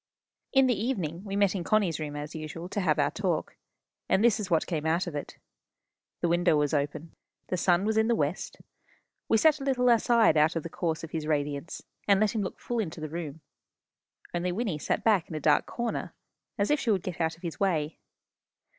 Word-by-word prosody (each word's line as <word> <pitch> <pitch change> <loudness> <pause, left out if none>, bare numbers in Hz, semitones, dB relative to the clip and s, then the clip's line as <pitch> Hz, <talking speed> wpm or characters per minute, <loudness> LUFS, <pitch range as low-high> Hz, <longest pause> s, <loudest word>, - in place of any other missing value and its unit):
In 270 -1 +5
the 255 - +3
evening 185 - -2
we 195 -1 -4
met 200 -2 +3
in 190 -3 -3
Connie's 195 -5 +1
room, 150 -1 -4
as 145 +1 -6
usual, 160 +2 -6
to 205 - -2
have 160 -5 +2
our 145 -1 +2
talk. 185 -6 -2 0.5
And 195 - +3
this 230 -3 +4
is 200 -3 -4
what 165 -3 +2
came 160 -3 -2
out 165 +3 +1
of 175 - -5
it. 145 - -6 0.8
The 175 - +2
window 175 -1 +3
was 150 0 +1
open. 150 +2 -2 0.4
The 185 - 0
sun 175 +2 +2
was 220 0 +1
in 220 0 +3
the 235 - +3
west. 150 +2 -2 0.7
We 225 - +5
sat 305 +4 +4
a - - -6
little 250 -2 +2
aside 230 -6 +4
out 155 +3 +4
of 165 - -2
the 165 - -5
course 165 -2 -2
of 165 - -7
his 155 -2 -3
radiance, 145 0 -2 0.2
and 200 -1 +5
let 215 -1 +2
him 220 - 0
look 190 - -5
full 240 -1 -3
into 170 -6 -3
the 155 0 -5
room. 160 -1 -6 0.9
Only 175 +1 -1
Wynnie 185 -6 -2
sat - - -1
back 205 -7 +3
in 160 - -6
a - - -2
dark 150 0 +3
corner, 235 -1 -3 0.4
as 205 +5 +1
if 295 - +3
she 240 - -2
would 195 -5 +2
get 175 -2 -4
out 160 0 0
of 165 - -24
his 170 -2 -5
way. 165 -6 0
175 Hz, 220 wpm, -28 LUFS, 155-210 Hz, 0.9 s, In